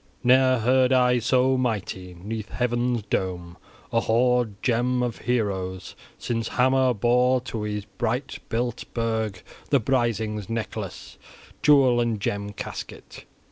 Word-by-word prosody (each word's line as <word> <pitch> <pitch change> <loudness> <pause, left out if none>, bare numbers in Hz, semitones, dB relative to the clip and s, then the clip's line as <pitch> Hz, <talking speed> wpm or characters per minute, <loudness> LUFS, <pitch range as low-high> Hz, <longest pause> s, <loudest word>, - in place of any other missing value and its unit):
Ne'er 130 +1 +5
heard 130 +3 +3
I 125 -1 +4
so 130 +2 +2
mighty, 95 -7 -3
'neath 105 +4 -6
heaven's 120 -1 -1
dome, 90 -3 -3 0.4
a 115 - +4
hoard 120 0 +2
gem 125 +1 +1
of 120 -2 -3
heroes, 95 -6 -2 0.2
since 115 -1 -2
Hama 130 0 +3
bore 125 +4 +3
to 120 -3 -5
his 105 -1 -3
bright 125 +6 -3
built 120 +1 -2
burg 110 -4 -2 0.3
the 140 - +4
Brisings' 110 -4 -1
necklace, 115 -1 -5 0.4
jewel 135 -5 +5
and 115 -3 -1
gem 100 0 -2
casket. 105 - -8
120 Hz, 125 wpm, -25 LUFS, 105-125 Hz, 0.4 s, Ne'er